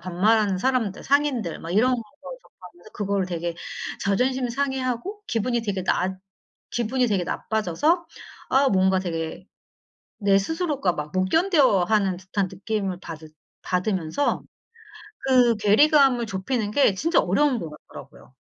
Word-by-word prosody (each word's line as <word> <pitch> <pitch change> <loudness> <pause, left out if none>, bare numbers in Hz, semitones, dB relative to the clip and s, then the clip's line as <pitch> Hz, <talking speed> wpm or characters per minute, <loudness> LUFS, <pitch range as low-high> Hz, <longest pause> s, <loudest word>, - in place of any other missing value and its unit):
반말하는 195 +2 +2
사람들, 230 -3 -1
상인들 275 - 0
막 165 - -7
이런 235 +7 +3
걸 240 - -4 0.4
접하면서 180 +3 -17
그거를 200 -2 -1
되게 170 -1 -3 0.5
자존심 250 +6 +1
상해 265 +1 -1
하고 255 - -4
기분이 235 +1 -1
되게 195 -4 -2
났 190 0 0 0.5
기분이 245 +2 0
되게 195 -5 0
나빠져서 220 - 0 0.4
아 270 +1 +4
뭔가 190 -1 +3
되게 170 0 -4 0.7
내 200 -2 +3
스스로가 290 - -1
막 150 -1 -5
못 185 0 +1
견뎌 295 - +3
하는 195 -2 +1
듯한 190 +1 -2
느낌을 195 -1 -3
받으 160 -3 -9 0.3
받으면서 185 - -1 0.8
그 250 -3 +4
괴리감을 250 +4 +4
좁히는 210 +2 -2
게 250 -5 +3
진짜 330 - +2
어려운 250 +7 +2
것 165 - -6
같더라고요. 150 - -14
210 Hz, 300 characters per minute, -24 LUFS, 185-260 Hz, 0.8 s, 아